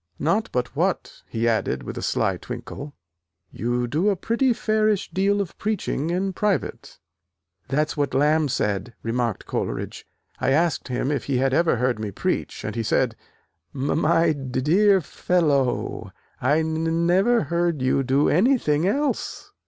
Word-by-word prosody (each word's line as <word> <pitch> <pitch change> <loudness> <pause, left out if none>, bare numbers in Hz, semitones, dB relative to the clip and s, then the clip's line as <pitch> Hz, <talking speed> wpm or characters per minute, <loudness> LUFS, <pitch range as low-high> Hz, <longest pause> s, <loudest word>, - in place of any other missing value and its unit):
Not 200 +9 0
but 125 +2 -2
what," 180 +5 -1
he 115 0 -1
added 115 -2 0
with - - -6
a - - -5
sly 95 -2 0
twinkle, 125 +6 -8 0.6
"you 120 +2 -1
do 155 - +1
a 200 - +2
pretty 235 +7 +1
fairish 215 -3 +1
deal 200 +2 +1
of 190 - -5
preaching 195 -7 -1
in 190 +2 -1
private." 205 0 -2 0.7
"That's 150 +2 0
what 145 -2 -1
Lamb 150 +2 +3
said," 105 -1 -2
remarked 115 -2 -1
Coleridge, - - -4 0.3
"I 135 - +2
asked 165 +1 +1
him 125 +2 -1
if 140 -4 -2
he 135 -2 0
had 135 +1 +1
ever 170 0 +3
heard 125 -1 0
me 110 -1 -3
preach, 100 - -3
and - - -3
he 115 - -1
said, 110 - +1 0.6
'M 145 +4 0
my 165 0 +3
d 135 -3 -3
dear 195 +8 +4
f 175 - -4
fellow, 145 -8 0 0.3
I 145 +5 +3
n 160 +1 -1
n 165 +1 +1
never 200 +7 +3
heard 170 -5 0
you 130 +1 +2
do 135 +2 +2
anything 180 - +3
else!' 285 +8 -2
155 Hz, 160 wpm, -24 LUFS, 130-185 Hz, 0.7 s, dear